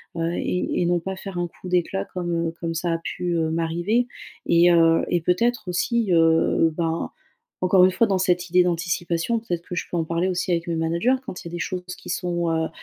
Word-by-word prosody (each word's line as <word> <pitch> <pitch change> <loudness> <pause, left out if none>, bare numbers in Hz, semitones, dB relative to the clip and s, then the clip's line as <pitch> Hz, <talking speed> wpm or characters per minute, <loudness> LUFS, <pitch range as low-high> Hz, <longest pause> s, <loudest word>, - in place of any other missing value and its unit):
heu 165 0 -1
et 180 - -1
et 175 - +2
non 175 0 +2
pas 190 +2 -5
faire 190 -2 -7
un 175 0 -1
coup 185 - -12
d'éclat 180 +1 0
comme, 170 -2 -2
heu, - - -2
comme 165 -1 -2
ça 170 +1 -1
a 165 - 0
pu, 180 -1 -3
heu, 160 -1 +1
m'arriver. 175 +9 0 0.4
Et 170 +1 +5
heu, 165 -1 +4
et 175 - +2
peut-être 210 +6 0
aussi, 205 +3 0
heu, 165 0 +3
ben, 165 -1 -1 0.5
encore 185 0 +5
une 185 - +6
fois 220 +5 +2
dans 195 - +1
cette 180 -1 +1
idée 180 +1 +5
d'anticipation, 175 +4 -1
peut-être 175 -7 -4
que 180 - -5
je - - -1
peux 175 - -1
en 165 - 0
parler 170 +3 0
aussi 180 0 -2
avec 170 -1 0
mes 170 - -1
managers 170 +10 +1
quand 185 - -7
il 170 - -7
y - - -12
a - - -12
des 175 - -4
choses 180 +1 -3
qui - - -14
sont, 175 -1 -1
heu 160 0 0
175 Hz, 235 wpm, -23 LUFS, 165-185 Hz, 0.5 s, une